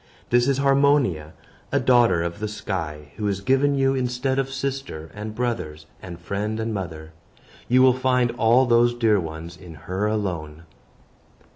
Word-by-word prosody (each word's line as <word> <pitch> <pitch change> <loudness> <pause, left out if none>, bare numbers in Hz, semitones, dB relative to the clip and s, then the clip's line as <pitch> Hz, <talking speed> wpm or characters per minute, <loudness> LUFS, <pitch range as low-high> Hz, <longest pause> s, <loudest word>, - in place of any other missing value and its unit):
This 120 +1 +4
is 140 -1 +2
Harmonia, 135 - +2 0.4
a - - +2
daughter 120 -9 +3
of 85 +3 -4
the 105 - -2
sky, 80 -8 -5
who 105 - -2
is 100 -2 -1
given 135 +6 +2
you 135 0 +2
instead 130 +1 -1
of 135 0 -1
sister, 135 - -5
and 105 +1 -7
brothers, 110 -11 -3 0.2
and 85 -1 -9
friend, 105 +5 -3
and 110 0 -2
mother. 80 -5 -6 0.6
You 130 +1 +4
will 130 -1 +6
find 125 -1 +1
all 120 +2 +3
those 120 0 +3
dear 110 -4 +3
ones 80 0 -7
in 85 -3 -12
her 95 +7 -3
alone." 85 -7 -3
110 Hz, 160 wpm, -23 LUFS, 85-130 Hz, 0.6 s, will